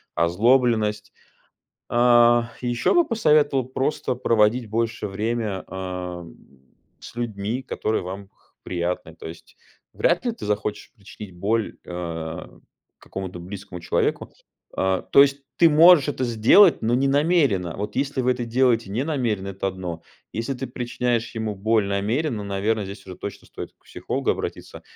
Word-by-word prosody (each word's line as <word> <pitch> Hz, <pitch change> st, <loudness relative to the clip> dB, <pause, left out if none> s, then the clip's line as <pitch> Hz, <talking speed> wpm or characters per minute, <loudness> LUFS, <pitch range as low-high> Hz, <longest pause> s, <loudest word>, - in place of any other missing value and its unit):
озлобленность. 105 Hz, +3 st, +2 dB, 0.8 s
А, 120 Hz, -1 st, +4 dB
ещё 120 Hz, -1 st, 0 dB
бы 350 Hz, -1 st, +5 dB
посоветовал 150 Hz, -, +3 dB
просто 130 Hz, +1 st, -2 dB
проводить 115 Hz, -1 st, +2 dB
больше 115 Hz, -1 st, -2 dB
время, 105 Hz, -1 st, -2 dB
ам, 90 Hz, -5 st, -6 dB, 0.7 s
с -, -, -11 dB
людьми, 115 Hz, +1 st, -3 dB
которые 110 Hz, -3 st, -2 dB
вам 95 Hz, +2 st, -7 dB
х -, -, -43 dB, 0.3 s
приятны. 90 Hz, -1 st, -3 dB
То 80 Hz, -, -9 dB
есть 80 Hz, +1 st, -13 dB, 0.4 s
вряд 175 Hz, +8 st, +1 dB
ли 240 Hz, -, 0 dB
ты 230 Hz, -, -9 dB
захочешь 105 Hz, 0 st, -3 dB
причинить 100 Hz, -2 st, -11 dB
боль, 110 Hz, +4 st, -1 dB
а, 85 Hz, -2 st, -6 dB, 0.4 s
какому-то 95 Hz, -2 st, -7 dB
близкому 95 Hz, 0 st, -8 dB
человеку. 85 Hz, -, -1 dB, 0.4 s
А, 95 Hz, -1 st, +1 dB
то 140 Hz, -, +6 dB
есть 140 Hz, 0 st, 0 dB
ты 165 Hz, -1 st, +6 dB
можешь 160 Hz, -1 st, +7 dB
это 130 Hz, -3 st, -1 dB
сделать, 120 Hz, -, +5 dB
но 115 Hz, +2 st, +1 dB
не 135 Hz, +2 st, +2 dB
намеренно. 140 Hz, -, +2 dB
Вот 105 Hz, +1 st, -5 dB
если 140 Hz, 0 st, -1 dB
вы 125 Hz, 0 st, +2 dB
это 125 Hz, -1 st, -4 dB
делаете 115 Hz, -3 st, +1 dB
не 115 Hz, +7 st, -1 dB
намеренно- 120 Hz, -11 st, -1 dB
это 95 Hz, 0 st, -3 dB
одно. 90 Hz, -3 st, -6 dB, 0.3 s
Если 115 Hz, +5 st, -3 dB
ты 135 Hz, +1 st, -5 dB
причиняешь 120 Hz, -1 st, -2 dB
ему 110 Hz, -1 st, -2 dB
боль 110 Hz, +1 st, +1 dB
намеренно, 110 Hz, +5 st, -1 dB
наверно, 100 Hz, +2 st, -1 dB
здесь 100 Hz, +1 st, -9 dB
уже 90 Hz, -1 st, -9 dB
точно 100 Hz, -, -8 dB
стоит -, -, -8 dB
к -, -, -38 dB
психологу -, -, -2 dB
обратиться, -, -, -5 dB
110 Hz, 145 wpm, -23 LUFS, 95-125 Hz, 0.8 s, можешь